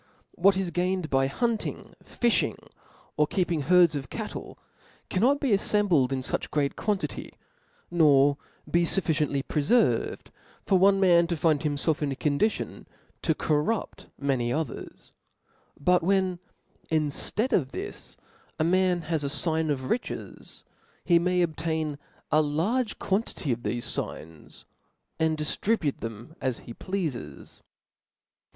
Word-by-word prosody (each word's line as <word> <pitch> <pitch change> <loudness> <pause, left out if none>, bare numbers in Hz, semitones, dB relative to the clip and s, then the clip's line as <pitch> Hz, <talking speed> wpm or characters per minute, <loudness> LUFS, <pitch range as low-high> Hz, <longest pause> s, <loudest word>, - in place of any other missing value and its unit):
What 195 +2 +3
is 190 -3 -1
gained 180 -1 -1
by 135 0 +3
hunting, 230 - -2
fifbing, 240 -2 0 0.6
or 150 0 +3
keeping 175 -1 0
herds 175 +1 +5
of 135 -3 -5
cattle, - - -6 0.5
cannot 260 +9 +3
be 275 -4 0
aflcmbled 195 -9 +2
in 135 -1 -1
fuch - - -2
great 145 -2 0
quantity, 205 -3 -3 0.6
nor 145 -4 +5 0.3
be 170 - +2
fufRciently 155 -6 +1
prefervcd, 150 - +1 0.4
for 190 - +3
one 195 +1 +5
man 170 -3 +5
to 170 -1 -2
find 155 -1 +2
himfelf 150 +1 0
in 145 -2 0
a - - -2
condition 150 +11 -1 0.3
to 160 - +1
corrupt 155 +10 -1
many 130 -4 0
others: 150 -1 -5 0.7
but 180 +5 +3
when, 185 0 +1 0.5
in 155 -2 +1 0.3
Read 250 +5 +1
of 135 -6 +1
this, - - -7 0.4
a - - +1
man 180 +1 +2
has 160 -2 -2
a - - 0
fign 160 +2 0
of 130 -2 -3
riches, 245 - -5 0.4
he 170 -1 +5
may 180 +1 +2
obtain 160 -2 -2 0.3
a' 155 - +5
large 195 - 0
quantity 195 - -1
of 120 - -1
thefe 120 +1 -3
f]gns, 80 -8 -5 0.6
and 160 -1 +1
diftribute 155 +1 -1
them 115 +5 -7
as 130 -3 -1
he 120 - -8
pleafes. 140 - -5
160 Hz, 130 wpm, -27 LUFS, 140-185 Hz, 0.7 s, herds